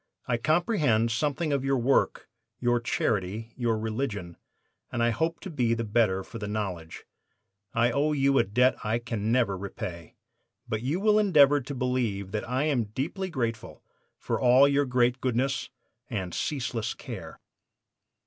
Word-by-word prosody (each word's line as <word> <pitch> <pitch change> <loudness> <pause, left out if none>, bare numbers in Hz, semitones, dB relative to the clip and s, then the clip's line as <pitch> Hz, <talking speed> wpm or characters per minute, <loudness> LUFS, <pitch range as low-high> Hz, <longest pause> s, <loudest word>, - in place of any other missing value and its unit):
I 120 - +1
comprehend 150 - +2
something 145 +6 0
of 140 -2 0
your 135 0 +1
work, 130 +3 +1 0.3
your 120 -1 +2
charity, 110 -1 -2
your 120 -3 0
religion, 110 -5 -3 0.6
and 120 - 0
I 120 - +3
hope 165 +7 -1
to 195 - -7
be 120 -6 +1
the 115 - -2
better 105 -3 +1
for 115 - -9
the 105 - -4
knowledge. 95 -6 -4 0.7
I 120 +1 +3
owe 145 +5 +1
you 140 -2 +3
a - - +5
debt 125 +5 +2
I 110 +2 +1
can 115 -2 -3
never 115 -5 +2
repay, 90 -3 -7 0.5
but 110 0 -2
you 140 +9 -1
will 210 +1 +4
endeavor 145 -8 +5
to 135 +3 -6
believe 120 -7 -1
that 110 +3 -3
I 130 +3 +1
am 140 -7 +1
deeply 155 - -4
grateful 115 -8 -4 0.3
for - - -3
all 130 +3 +6
your 140 0 +2
great 125 0 +1
goodness 130 +2 0 0.4
and 95 -8 -3
ceaseless 120 -6 -2
care. - - -8
120 Hz, 160 wpm, -27 LUFS, 110-140 Hz, 0.7 s, all